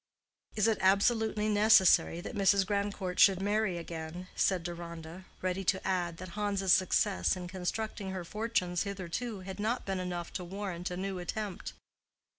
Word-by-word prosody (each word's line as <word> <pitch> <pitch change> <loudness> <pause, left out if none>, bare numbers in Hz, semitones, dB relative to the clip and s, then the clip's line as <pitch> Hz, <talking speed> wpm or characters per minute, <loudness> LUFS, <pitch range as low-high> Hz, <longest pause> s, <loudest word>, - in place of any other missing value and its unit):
"Is 215 0 +3
it 220 -2 +1
absolutely 210 +2 +3
necessary 210 -5 +5
that - - -7
Mrs. 195 -1 +3
Grandcourt 200 -2 -2
should 195 -3 +7
marry 205 -2 0
again?" 170 +2 -7
said 185 -3 +1
Deronda, 170 +1 -7 0.2
ready 185 +1 -1
to 190 +1 0
add 175 -3 -1
that 185 +1 -8
Hans's 200 -1 +1
success 175 - +2
in 180 -1 -6
constructing 190 +3 -4
her 185 -2 -5
fortunes 195 -4 -1
hitherto 200 +3 -4
had 190 +1 -8
not 220 +4 -1
been 195 -1 -2
enough 175 -2 -4
to 180 - -4
warrant 185 -1 -5
a 180 - -5
new 190 0 -3
attempt. 195 +2 -5
190 Hz, 155 wpm, -31 LUFS, 180-205 Hz, 0.2 s, should